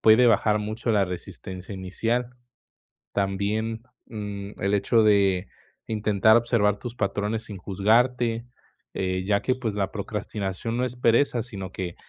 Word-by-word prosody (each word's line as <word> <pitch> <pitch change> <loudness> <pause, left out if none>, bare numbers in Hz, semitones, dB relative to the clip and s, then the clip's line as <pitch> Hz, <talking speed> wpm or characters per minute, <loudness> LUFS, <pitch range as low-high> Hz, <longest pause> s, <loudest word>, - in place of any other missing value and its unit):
puede 110 +3 +6
bajar 105 -1 +4
mucho 110 +3 -2
la 100 -3 +3
resistencia 90 +2 -7
inicial. 115 +6 -2 0.8
También, 105 +3 -1 0.2
mm, 105 -2 -6
el 100 +1 +2
hecho 110 +3 +3
de 100 -3 +3 0.4
intentar 110 0 +3
observar 105 -4 +2
tus 120 -1 -7
patrones 105 +1 -1
sin 100 - -8
juzgarte, 115 +5 +1 0.5
eh, 95 0 -1
ya 100 0 +2
que 130 - +1
pues 115 -5 -3
la 100 -2 -1
procrastinación 105 +1 -4
no 125 - +1
es 125 -1 -3
pereza, 120 0 +3
sino 95 -6 -7
que 90 -2 -4
105 Hz, 140 wpm, -25 LUFS, 100-115 Hz, 0.8 s, puede